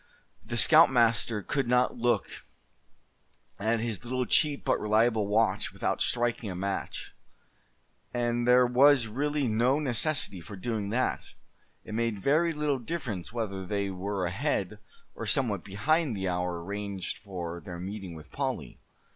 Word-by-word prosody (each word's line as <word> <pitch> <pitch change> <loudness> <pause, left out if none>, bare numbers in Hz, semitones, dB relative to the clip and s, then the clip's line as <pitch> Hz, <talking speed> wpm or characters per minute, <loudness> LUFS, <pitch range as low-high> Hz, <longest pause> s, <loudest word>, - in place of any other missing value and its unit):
The 120 +3 -4
scoutmaster 115 - +5
could 135 +2 -1
not 125 +1 +2
look 120 0 +1 1.3
at 110 +2 +1
his 115 -3 -3
little 125 +1 -1
cheap 145 +1 +2
but - - +2
reliable 110 0 +2
watch 105 -1 +1
without - - -2
striking 120 -2 0
a 90 - -5
match; 95 +2 -4 1.0
and 120 0 -1
there 125 0 +6
was 130 +1 +5
really 145 +5 -1
no 120 +5 +2
necessity 140 - -1
for 85 +5 -9
doing 105 +1 -3
that. 125 +4 -1 0.5
It 110 - -8
made 115 -1 0
very 155 - +2
little 150 -3 -1
difference 120 - -4
whether 105 -5 -3
they 100 +1 -2
were 95 0 -3
ahead, 90 - -2 0.3
or - - -6
somewhat 110 -9 +1
behind 120 - 0
the 95 0 -2
hour 90 -1 -2
arranged 100 -1 -4
for 85 -4 -6
their 90 -3 -7
meeting 95 -1 -6
with 80 -2 -12
Polly. - - -4
115 Hz, 140 wpm, -28 LUFS, 100-125 Hz, 1.3 s, there